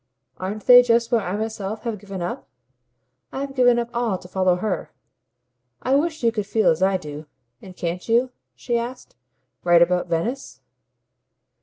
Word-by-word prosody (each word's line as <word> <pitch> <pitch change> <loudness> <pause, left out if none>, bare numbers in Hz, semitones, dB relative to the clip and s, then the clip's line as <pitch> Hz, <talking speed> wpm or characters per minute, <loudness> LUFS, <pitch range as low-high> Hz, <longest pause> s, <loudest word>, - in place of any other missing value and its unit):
Aren't 200 +3 -5
they 245 0 +9
just 235 -1 +1
what 235 -2 +3
I 195 +1 -3
myself 215 -1 -4
have 230 -4 -3
given 195 -3 -6
up? 175 - -5 0.8
I've 275 0 -5
given 245 -2 +4
up 235 0 -2
all 235 -5 0
to 180 - -13
follow 185 -1 +2
HER. 190 +2 -3 0.9
I 260 - +1
wish 310 +1 0
you 230 - +4
could 210 -3 -3
feel 220 +1 +3
as 160 +2 -2
I 190 0 +3
do. 150 -3 -9 0.3
And 185 -2 -12
can't 175 +4 -4
you," 245 +3 +3 0.2
she 240 -1 -1
asked, 255 - -7 0.5
"write 175 -1 +6
about 180 +1 0
Venice?" 170 - -3
215 Hz, 165 wpm, -22 LUFS, 180-240 Hz, 0.9 s, they